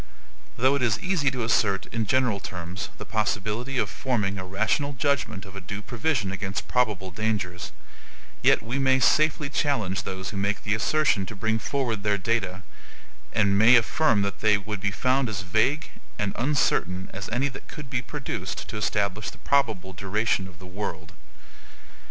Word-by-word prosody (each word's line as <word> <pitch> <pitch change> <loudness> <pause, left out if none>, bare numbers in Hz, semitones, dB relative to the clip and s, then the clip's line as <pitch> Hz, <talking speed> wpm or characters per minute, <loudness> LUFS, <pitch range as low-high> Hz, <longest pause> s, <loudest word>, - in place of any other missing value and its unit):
Though 130 +3 +4
it 140 - 0
is 115 -3 +2
easy 180 -7 +1
to 130 -2 -3
assert, 100 -4 +2
in 110 -2 -1
general 125 -3 +2
terms, 90 -1 -5
the - - -7
possibility 110 +4 -1
of - - +2
forming 105 -7 -1
a - - -4
rational 110 +10 0
judgment 130 -8 -1
of 95 0 -12
a 100 - -6
due 100 +2 -6
provision 120 -4 -1
against 95 0 -3
probable 105 -7 0
dangers, 90 -3 -2 0.7
yet - - +4
we 120 +4 -2
may 130 -1 +4
safely 150 +3 +3
challenge 115 -10 0
those 95 +1 -5
who 100 - -5
make 100 +1 -1
the 105 - +1
assertion 110 -3 +2
to 105 - -7
bring 110 +2 0
forward 120 -3 -1
their 105 0 +2
data, 95 -3 -1 0.7
and 100 -2 +3
may 115 +4 +8
affirm 115 -2 +3
that 100 - -3
they 105 -1 +4
would 105 0 -5
be 100 - +1
found 130 +5 +1
as 95 -3 -3
vague 110 +10 +1 0.3
and 100 -1 -1
uncertain 100 - +1
as 100 +1 -5
any 125 +5 +1
that 125 - -10
could 150 -2 -8
be 130 -1 -1
produced 145 +1 -5
to - - -4
establish 105 -1 0
the - - -13
probable 110 -9 +1
duration 100 +1 0
of 90 -2 -14
the 95 - -12
world. 90 -4 -5
105 Hz, 175 wpm, -26 LUFS, 95-125 Hz, 0.7 s, may